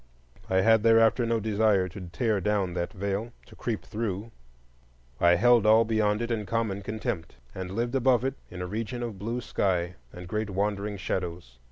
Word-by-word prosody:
I 95 0 +3
had 110 +2 +5
thereafter 115 +1 +4
no 115 0 +1
desire 105 -3 +2
to 90 -1 -9
tear 110 -2 0
down 100 -2 0
that 85 -1 -2
veil, 100 +4 -3
to - - -16
creep 115 -3 -3
through; 105 0 -4 0.9
I 85 0 +5
held 120 +2 +5
all 110 +1 +6
beyond 110 0 +1
it 120 - -3
in 105 -3 -2
common 110 -4 -1
contempt, 100 -5 -4 0.2
and 95 -1 -5
lived 120 +5 -2
above 130 -2 +3
it 135 - 0 0.2
in 90 0 -6
a - - -3
region 115 +5 -4
of 110 -5 -5
blue 115 +5 -3
sky 90 -5 0 0.2
and 90 0 -9
great 105 +1 -2
wandering 100 +1 -1
shadows. 85 -9 -4
105 Hz, 180 wpm, -27 LUFS, 95-115 Hz, 0.9 s, all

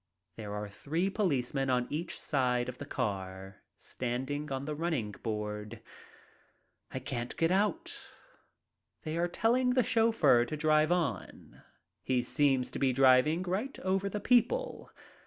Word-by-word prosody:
There 105 -2 -6
are 105 0 -4
three 160 - -2
policemen 135 - 0
on 125 -1 +2
each 165 +4 -3
side 125 -4 0
of 125 0 -7
the 145 - -7
car, 95 -4 -4 0.2
standing 135 +4 -4
on 135 +1 -3
the 150 - -3
running 150 -9 -2
board. 105 -1 -5 1.1
I - - -6
can't 125 -2 -4
get 165 +1 +2
out. 320 - 0 1.0
They 155 0 -3
are 170 +1 +1
telling 250 +7 +2
the 255 - +4
chauffeur 225 - +4
to 155 - -5
drive 155 +1 +3
on. 160 - -3 0.4
He 125 -2 0
seems 135 -4 +1
to - - -5
be 135 -1 +3
driving 135 +6 +4
right 195 +9 -3
over 190 +1 0
the 210 - -3
people. 250 - +1
145 Hz, 140 wpm, -31 LUFS, 125-180 Hz, 1.1 s, the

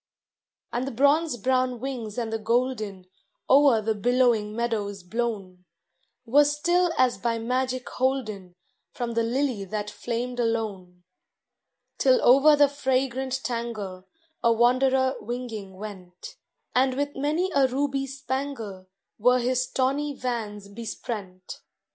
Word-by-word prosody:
And 245 +2 -1
the - - -3
bronze 285 +3 +2
brown 255 +1 +1
wings 240 -4 -5
and 230 -2 -2
the 225 - -1
golden, 220 -4 -1 0.4
O'er 270 -5 +5
the 220 +1 +1
billowing 230 -1 +2
meadows 210 -5 -2
blown, 195 -3 -4 0.6
Were 280 +5 +5
still 345 +5 +2
as 255 -2 +3
by 235 -1 0
magic 255 +2 -1
holden 215 -9 -2 0.3
From 240 -1 -4
the 230 0 +1
lily 240 -2 0
that 210 +1 -4
flamed 245 +2 -4
alone; 205 -6 -2 1.0
Till 260 -2 +5
over 275 +5 +7
the 290 0 +6
fragrant 265 -1 -1
tangle 215 -6 -4 0.3
A 235 - +4
wanderer 260 +3 +3
winging 225 -5 -6
went, 185 -3 -9 0.4
And 260 0 +3
with 285 +1 -2
many 310 +7 0
a 275 -2 +4
ruby 275 +1 -1
spangle 260 -8 -5 0.3
Were 250 +4 +5
his 250 +1 0
tawny 280 +2 0
vans 215 -6 -4
besprent. 200 -3 -7
245 Hz, 125 wpm, -26 LUFS, 215-265 Hz, 1.0 s, over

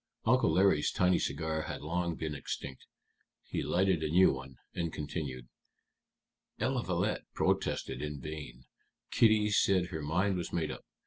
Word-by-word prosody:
Uncle 130 +3 +4
Larry's 95 -6 +3
tiny 90 0 +3
cigar 80 +2 -1
had - - -5
long 85 +2 -1
been 80 -1 -3
extinct. 70 -1 -6 0.6
He - - -3
lighted 95 -2 +2
a 80 - -1
new 90 +4 +5
one, 65 0 -8 0.2
and 85 -2 -2
continued: 70 -5 -5 1.1
"Eliphalet - - 0
protested - - 0
in 75 -1 -4
vain. 70 -4 -7 0.5
Kitty 110 -2 +4
said 95 -3 +3
her 80 - -4
mind 90 +6 +1
was 85 - -4
made 80 -3 -1
up. - - -8
80 Hz, 140 wpm, -32 LUFS, 75-90 Hz, 1.1 s, new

